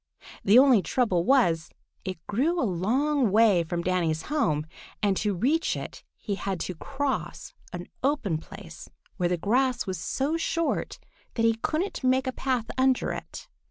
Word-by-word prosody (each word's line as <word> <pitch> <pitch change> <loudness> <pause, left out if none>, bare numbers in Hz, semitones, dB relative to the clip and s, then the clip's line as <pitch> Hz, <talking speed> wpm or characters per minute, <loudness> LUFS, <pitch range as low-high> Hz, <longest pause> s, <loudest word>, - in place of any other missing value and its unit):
The 205 +4 +6
only 260 -5 +7
trouble 185 -1 +1
was 175 -12 +3 0.3
it 185 -1 -4
grew 300 - 0
a 265 - +2
long 245 - +1
way 210 -3 +5
from 170 +1 -3
Danny's 170 -3 0
home, 155 - +1 0.4
and 200 -2 +3
to 210 -2 0
reach 285 - +1
it - - -8
he 205 - -4
had 195 -2 -3
to 185 - -3
cross 270 - -4 0.2
an 175 0 -6 0.2
open 245 - 0
place - - -11 0.3
where 175 -3 +1
the 180 - 0
grass 245 +7 +1
was 185 -4 -4
so 275 - -1
short 330 0 -1 0.4
that 230 - +1
he 230 - +5
couldn't 315 - -2
make 260 +1 +2
a 260 - -1
path 255 -3 -1
under 260 -1 +2
it. - - -7
225 Hz, 160 wpm, -27 LUFS, 180-270 Hz, 0.4 s, only